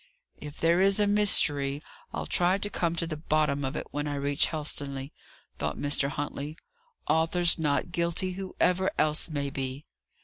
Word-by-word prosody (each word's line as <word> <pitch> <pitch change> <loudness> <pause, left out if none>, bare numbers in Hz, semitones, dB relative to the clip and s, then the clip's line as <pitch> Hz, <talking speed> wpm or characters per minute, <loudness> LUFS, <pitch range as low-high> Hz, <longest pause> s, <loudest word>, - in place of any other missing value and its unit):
"If 150 -1 -9
there 170 +2 +3
is 195 +2 +4
a 205 - +4
mystery, 145 -9 +3 0.3
I'll - - -4
try 180 +2 +3
to 205 +1 -2
come 170 -1 0
to 170 - 0
the 165 -2 -4
bottom 150 -2 +1
of 135 +2 -2
it, - - -3
when 145 0 -2
I 145 - -2
reach 140 0 +1
Helstonleigh," 145 -3 -4 0.5
thought - - -2
Mr. 145 -1 +1
Huntley. 145 +1 -4 0.5
"Arthur's 165 +2 +2
not 150 +2 0
guilty, 170 +2 0
whoever 190 0 0
else 155 +2 +2
may 140 -2 -2
be." 135 +1 -4
155 Hz, 165 wpm, -28 LUFS, 145-175 Hz, 0.5 s, is